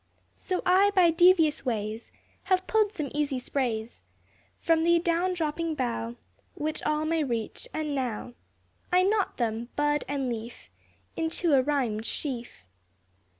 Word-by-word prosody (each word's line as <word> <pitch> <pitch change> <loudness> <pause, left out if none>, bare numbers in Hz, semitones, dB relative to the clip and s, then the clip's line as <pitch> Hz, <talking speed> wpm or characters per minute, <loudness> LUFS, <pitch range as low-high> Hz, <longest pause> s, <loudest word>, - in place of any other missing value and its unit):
So 370 -1 -3
I 380 +3 +5
by 350 -3 +6
devious 335 -2 +4
ways 220 -2 -3 0.3
Have 370 -1 +2
pulled 430 -2 +2
some 305 -10 -4
easy 290 -2 0
sprays 240 -3 -3 0.6
From 325 -1 +2
the 340 +1 +5
down 345 +2 +1
dropping 325 0 -2
bough 235 -3 -2 0.4
Which 305 +1 -2
all 305 0 0
may 325 0 +1
reach, 235 - -3
and 305 -2 -3
now 245 -3 -3 0.6
I 365 +1 +5
knot 405 0 +1
them, 230 0 -2
bud 295 0 +1
and 275 -2 -2
leaf, 235 0 -6 0.4
Into 325 0 0
a 270 - +6
rhymed 250 -6 -1
sheaf. 240 - -5
295 Hz, 140 wpm, -27 LUFS, 245-340 Hz, 0.6 s, by